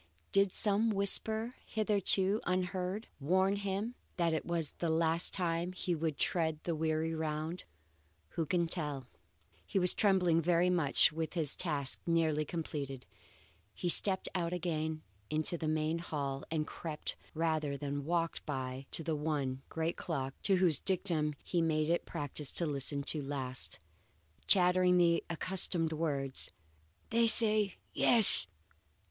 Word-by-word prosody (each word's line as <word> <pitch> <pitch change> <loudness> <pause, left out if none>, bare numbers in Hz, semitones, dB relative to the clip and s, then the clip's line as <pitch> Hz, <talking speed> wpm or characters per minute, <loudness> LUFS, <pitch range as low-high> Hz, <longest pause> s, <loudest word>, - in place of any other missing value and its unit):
Did 195 -1 +3
some 210 +3 +2
whisper, 220 +3 -1
hitherto 205 -1 +1
unheard, 185 +3 -2
warn 190 +7 +1
him 200 +3 -4 0.2
that 170 -2 0
it 160 - -3
was 165 -3 -3
the 170 - -1
last 165 +1 +2
time 175 -1 -2
he 180 -1 -3
would 160 -2 -3
tread 160 -3 0
that 170 - -2
weary 160 +1 -2
round? 160 +2 -4 0.6
Who 165 -3 -4
can 175 0 0
tell? 150 -6 -5 0.6
He 195 - -4
was 180 -1 +4
trembling 180 -5 +2
very 175 +2 +2
much 160 -5 +3
when 160 - -10
with 160 - -3
his 160 -5 -1
task 145 -6 0
nearly 160 -2 +1
completed, 140 -5 -6 0.7
he 175 - -3
stepped 190 +2 +4
out 175 -2 -2
again 160 -3 -3 0.3
into 155 +2 -1
the 160 -2 -4
main 155 +1 -1
hall 140 -4 -5
and 155 -1 -2
crept 155 -1 -7 0.2
rather 155 -3 -1
than 145 0 -5
walked 165 +2 -2
back 130 -1 -5
to 165 - +1
the 160 0 -2
one 145 -4 -3
great 165 +1 -3
clock 135 -5 -4
to 195 - +2
whose 180 -5 +2
dictum 165 -6 0
he 175 - -1
made 155 -1 0
it 170 - +1
a - - -33
practice 145 0 -1
to 170 - +1
listen 140 -1 -1 0.2
last. 130 -3 -3 0.7
Chattering 180 -1 +4
the 170 -1 +2
accustomed 170 -1 +1
words, 140 -4 -1 0.6
"They 230 +1 +3
say 215 -3 +4 0.2
Yes! 210 - +9
165 Hz, 145 wpm, -32 LUFS, 150-180 Hz, 0.7 s, Yes